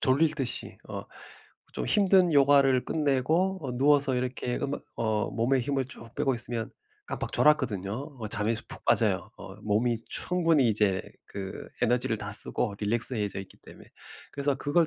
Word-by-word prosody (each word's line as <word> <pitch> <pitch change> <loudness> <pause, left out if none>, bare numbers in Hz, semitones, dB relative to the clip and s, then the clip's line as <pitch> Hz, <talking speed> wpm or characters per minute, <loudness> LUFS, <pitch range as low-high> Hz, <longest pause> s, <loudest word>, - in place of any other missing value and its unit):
졸리듯이 140 -1 0
어 - - -6 0.7
좀 - - -3
힘든 190 -4 +4
요가를 140 -2 +4
끝내고 160 +6 0
어 130 -3 -4
누워서 140 0 +3
이렇게 125 0 -2
음악 140 +1 -3
어 110 -2 -1
몸에 125 +4 +1
힘을 135 0 -1
쭉 115 -4 -11
빼고 135 -2 0
있으면 115 -1 -4 0.4
깜빡 - - -4
졸았거든요. 120 -11 +2 0.3
어 110 - -4
잠에 105 +2 0
수 - - -6
푹 - - -7
빠져요. - - +1
어 95 - -11
몸이 110 +3 -1
충분히 165 -7 +2
이제 105 -3 +1 0.2
그 95 -1 -7
에너지를 120 -1 +1
다 100 0 -6
쓰고 105 0 +4
릴렉스해져 105 -2 +1
있기 95 - -13
때문에. - - -16 0.4
그래서 140 0 0
그걸 155 +4 +1
125 Hz, 325 characters per minute, -28 LUFS, 110-145 Hz, 0.7 s, 힘든